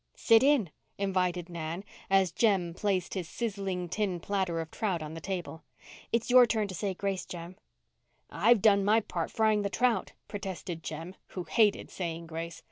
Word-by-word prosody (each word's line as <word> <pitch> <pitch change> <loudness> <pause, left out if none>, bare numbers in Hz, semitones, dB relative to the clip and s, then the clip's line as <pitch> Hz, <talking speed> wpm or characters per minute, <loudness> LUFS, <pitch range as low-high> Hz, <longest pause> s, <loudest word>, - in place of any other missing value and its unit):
"Sit 225 -1 +5
in," 265 - +3 0.3
invited 180 -3 0
Nan, 170 +1 -5 0.3
as 195 -2 +4
Jem 185 -3 +2
placed 190 -1 -1
his 180 -4 -4
sizzling 195 -6 -3
tin 185 0 -1
platter 185 -2 -1
of 160 -1 -5
trout 185 -7 -1
on 155 0 -7
the 165 - -7
table. 175 -2 -4 0.5
"It's 230 +1 0
your 250 -1 +8
turn 220 -2 0
to - - -5
say 190 +2 -2
grace, 195 0 -2
Jem." 175 +1 -7 0.7
"I've 215 +4 +3
done 200 -2 +5
my 215 +3 +4
part 170 -5 -3
frying 215 -1 +2
the 200 - -1
trout," 240 +5 +1
protested 190 -4 -5
Jem, 160 +4 -6
who 180 - -5
hated 210 +2 +2
saying 170 -2 -4
grace. 165 0 -6
190 Hz, 170 wpm, -30 LUFS, 170-210 Hz, 0.7 s, your